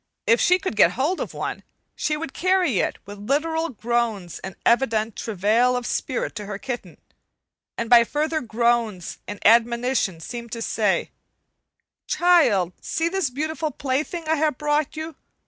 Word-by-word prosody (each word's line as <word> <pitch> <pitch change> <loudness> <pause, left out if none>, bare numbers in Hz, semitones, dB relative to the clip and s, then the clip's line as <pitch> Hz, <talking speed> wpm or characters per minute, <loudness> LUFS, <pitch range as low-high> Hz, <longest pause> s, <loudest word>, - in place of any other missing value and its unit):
If 230 - +4
she 360 - +5
could 370 - -4
get 180 -4 +5
hold 295 +9 0
of - - -4
one, - - -4 0.3
she 300 - -1
would 300 -3 -6
carry 365 - +2
it - - -1
with 205 0 -10
literal 320 +8 0
groans 230 - -2
and 190 -1 -8
evident 225 -3 +2
travail 225 +4 +1
of 245 - -4
spirit 255 - -2
to 210 -1 -6
her 200 -1 -4
kitten, 245 +2 -6 0.8
and 230 - -2
by 235 0 +7
further 310 +5 -1
groans 230 -5 0
and 205 - -6
admonitions 235 -6 +3
seem 235 -1 -7
to 230 - -5
say: 210 -4 0 1.0
"Child, 240 - +3
see 330 +1 -1
this 385 -5 0
beautiful 310 +4 -2
plaything 300 +4 -3
I 320 0 +2
have 300 -3 +1
brought 295 0 0
you. 315 -1 -6
245 Hz, 155 wpm, -23 LUFS, 220-310 Hz, 1.0 s, by